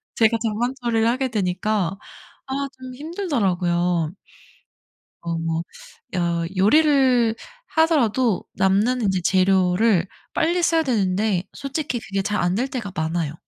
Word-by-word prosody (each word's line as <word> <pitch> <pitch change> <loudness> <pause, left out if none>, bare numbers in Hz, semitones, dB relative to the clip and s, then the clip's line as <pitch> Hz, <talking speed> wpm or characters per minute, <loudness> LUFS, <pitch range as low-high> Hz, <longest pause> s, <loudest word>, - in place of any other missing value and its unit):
제가 230 0 +3
잔반 230 +3 -1
처리를 230 -2 +1
하게 255 +2 0
되니까 195 -2 -1 0.5
아 275 +1 -2
좀 255 0 -9
힘들더라고요. 180 - 0 1.1
어 170 -1 -3
뭐 165 0 -2 0.5
여 170 -2 0
요리를 255 0 +4 0.3
하더라도 260 - +2
남는 205 +7 +2
인제 190 -3 +1
재료를 185 +1 +3 0.3
빨리 345 +2 +1
써야 330 -1 +3
되는데 200 - 0
솔직히 275 -3 -3
그게 195 -2 -3
잘 210 +2 -1
안될 190 +9 0
때가 240 -7 -5
많아요. 160 -1 -1
215 Hz, 255 characters per minute, -22 LUFS, 180-255 Hz, 1.1 s, 요리를